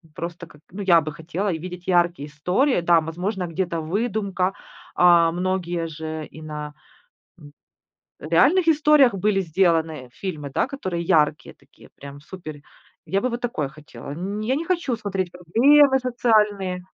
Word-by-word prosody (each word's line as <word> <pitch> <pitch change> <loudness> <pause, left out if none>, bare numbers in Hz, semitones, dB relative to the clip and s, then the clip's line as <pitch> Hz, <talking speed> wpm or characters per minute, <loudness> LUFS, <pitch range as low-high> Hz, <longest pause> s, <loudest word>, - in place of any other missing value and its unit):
Просто, 170 +1 -6
как, 150 - -19
ну, 195 +3 -7
я 180 -4 +5
бы 155 0 -5
хотела 180 +5 -3
видеть 180 +2 -7
яркие 175 -5 +1
истории. 180 - 0
Да, 170 -1 +4
возможно 180 +5 -3
где-то 170 -1 -2
выдумка. 195 +1 -1 0.4
А 170 -2 +5
многие 175 -2 -2
же 160 0 -6
и 155 - -13
на, 150 -1 -7 1.5
м, 155 - -9
реальных 335 - +4
историях 300 -5 +5
были 195 +1 +1
сделаны, 165 -5 0
э, - - -25
фильмы, 150 -2 -6
да, - - 0
которые 185 -12 -4
яркие 155 -2 +1
такие, - - -21
прям 140 0 -11
супер. 155 -2 -10 0.4
Я 195 - 0
бы 255 - 0
вот 240 0 -5
такое 230 - -2
хотела. 150 -1 -11
Ни 200 +7 -4
я 260 - +2
не 310 - -2
хочу 335 -8 -1
смотреть 195 -4 -3
проблемы 265 - +4
социальные. 210 -7 +1
180 Hz, 150 wpm, -23 LUFS, 160-210 Hz, 1.5 s, я